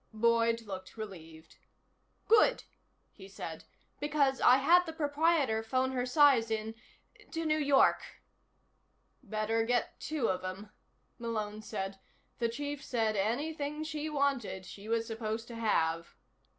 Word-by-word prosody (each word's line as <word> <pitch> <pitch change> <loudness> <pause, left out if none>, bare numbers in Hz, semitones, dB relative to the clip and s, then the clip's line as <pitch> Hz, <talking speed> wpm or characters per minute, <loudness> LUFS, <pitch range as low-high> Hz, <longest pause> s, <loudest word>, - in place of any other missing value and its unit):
Boyd 230 +1 +2
looked 190 -1 -8
relieved. 165 -7 -10 0.7
"Good," 455 +3 +5 0.5
he 190 -2 -13
said. 165 -4 -8 0.3
"Because 285 -2 +1
I 250 - +7
had 345 +6 +5
the 320 - -5
proprietor 295 -6 +1
phone 255 +3 0
her 255 -1 -1
size 265 -5 +5
in, 220 0 -2 0.6
to 330 0 -3
New 310 0 +2
York." 280 -2 +4 1.2
"Better 220 -1 -1
get 245 +1 -1
two 295 -6 -1
of 185 0 -1
'em," 190 +3 -6 0.5
Malone 215 -2 -3
said. 195 -2 -5 0.4
"The 235 -1 +1
Chief 285 +3 -5
said 225 -5 0
anything 290 +8 -2
she 310 0 -4
wanted, 275 -10 -1
she 200 +3 -10
was 230 0 +1
supposed 225 0 -4
to 235 - -7
have." 165 -7 0
230 Hz, 130 wpm, -32 LUFS, 215-285 Hz, 1.2 s, I